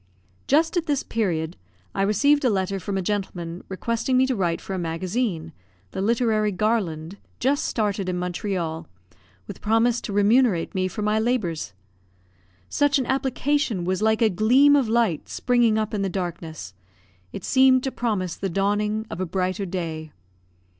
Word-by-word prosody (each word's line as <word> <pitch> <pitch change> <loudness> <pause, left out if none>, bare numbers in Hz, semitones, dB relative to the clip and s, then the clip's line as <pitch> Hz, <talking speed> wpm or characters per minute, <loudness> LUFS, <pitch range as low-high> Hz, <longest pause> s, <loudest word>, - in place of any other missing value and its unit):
Just 320 +5 +3
at 335 - -1
this 285 -3 0
period 170 -7 -2 0.4
I - - -1
received 285 +9 +3
a 255 - +4
letter 195 -1 -1
from 195 +1 -3
a 190 - -1
gentleman, 180 -3 -3
requesting 230 +6 -1
me 260 - +5
to 260 -1 0
write 175 -5 0
for 195 - -6
a 190 - -2
magazine 170 0 -2 0.4
(the - - -4
Literary 220 -1 +2
Garland) 190 -4 -1 0.2
just 275 +3 +1
started 205 -4 -1
in 180 - -1
Montreal, 175 -3 -3 0.6
with - - -9
promise 225 +2 +2
to - - -5
remunerate 205 -2 +3
me 185 -1 0
for 200 +3 -5
my 210 +1 +2
labours. 215 - -1 0.9
Such 290 - +2
an 265 - -1
application 265 -5 0
was 185 +1 -1
like 220 +1 +3
a 220 - +5
gleam 255 +9 +5
of 265 -6 +2
light 225 -8 +1
springing 240 -3 +2
up 215 0 -1
in 205 - -1
the 195 - 0
darkness; 165 - -5 0.6
it - - -7
seemed 260 -1 +4
to 265 - -1
promise 205 -9 -2
the 195 - -3
dawning 205 +3 0
of 170 - -4
a - - 0
brighter 185 +2 -1
day. 160 -4 -4
205 Hz, 165 wpm, -24 LUFS, 180-240 Hz, 0.9 s, me